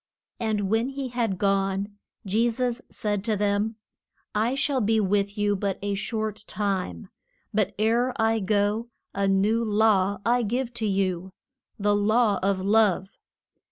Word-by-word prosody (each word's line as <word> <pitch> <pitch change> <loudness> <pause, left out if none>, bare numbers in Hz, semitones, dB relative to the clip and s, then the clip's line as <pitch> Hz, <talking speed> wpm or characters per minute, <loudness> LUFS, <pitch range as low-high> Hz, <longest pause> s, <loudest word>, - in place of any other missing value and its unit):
And 220 -3 0
when 225 +5 +1
he 270 -1 -4
had 235 -5 -1
gone, 195 +1 0 0.3
Je 220 +5 +2
sus 245 +1 -1
said 205 -3 -2
to 220 -2 +1
them, 205 +2 0 0.6
I 225 +5 +1
shall 275 -2 +1
be 220 +1 +2
with 200 0 0
you 205 0 +2
but 195 -1 -2
a 205 0 -1
short 215 +1 -3
time. 190 - -2 0.4
But 205 -1 0
ere 230 +4 +2
I 225 0 +2
go 210 +3 0 0.2
a 200 0 0
new 205 +4 +2
law 205 -2 +3
I 245 +1 +3
give 245 +3 -2
to 220 - +1
you 190 -2 -1 0.4
the 205 -1 +2
law 210 0 +3
of 195 0 +1
love. 200 -1 +2
210 Hz, 150 wpm, -26 LUFS, 200-225 Hz, 0.6 s, law